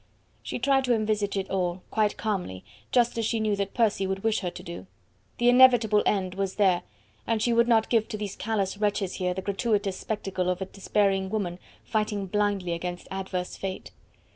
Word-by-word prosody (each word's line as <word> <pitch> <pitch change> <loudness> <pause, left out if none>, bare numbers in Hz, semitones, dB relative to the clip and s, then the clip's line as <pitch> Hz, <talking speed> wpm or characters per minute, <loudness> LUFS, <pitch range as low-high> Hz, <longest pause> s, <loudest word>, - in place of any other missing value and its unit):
She - - -4
tried 270 +2 +2
to 245 -1 +3
envisage 210 -2 0
it 195 0 -2
all, 180 -1 -1
quite 215 -2 +1
calmly, 180 - -3 0.3
just 240 -1 +2
as 225 - 0
she 230 - 0
knew 215 -1 +1
that 200 0 -3
Percy 210 -5 +2
would 190 0 -3
wish 225 -1 +2
her 180 - -2
to - - -10
do. 170 +2 -8 0.5
The 240 - +2
inevitable 245 -4 +6
end 185 -3 +1
was 195 0 -2
there, 190 -4 +3 0.5
and 225 -1 +1
she 235 +2 +2
would 235 0 +4
not 225 -2 +4
give 225 -2 +2
to 215 - -5
these 205 -2 -5
callous 205 -3 -2
wretches 205 -3 0
here 180 -1 -1
the 190 - -4
gratuitous 200 -1 0
spectacle 195 -4 -2
of 180 0 -1
a 190 - -2
despairing 195 0 0
woman 185 -4 -2 0.2
fighting 210 -2 -1
blindly 200 -2 0
against 175 +1 -5
adverse 190 -1 -4
Fate. 190 -1 -5
200 Hz, 190 wpm, -27 LUFS, 190-220 Hz, 0.5 s, inevitable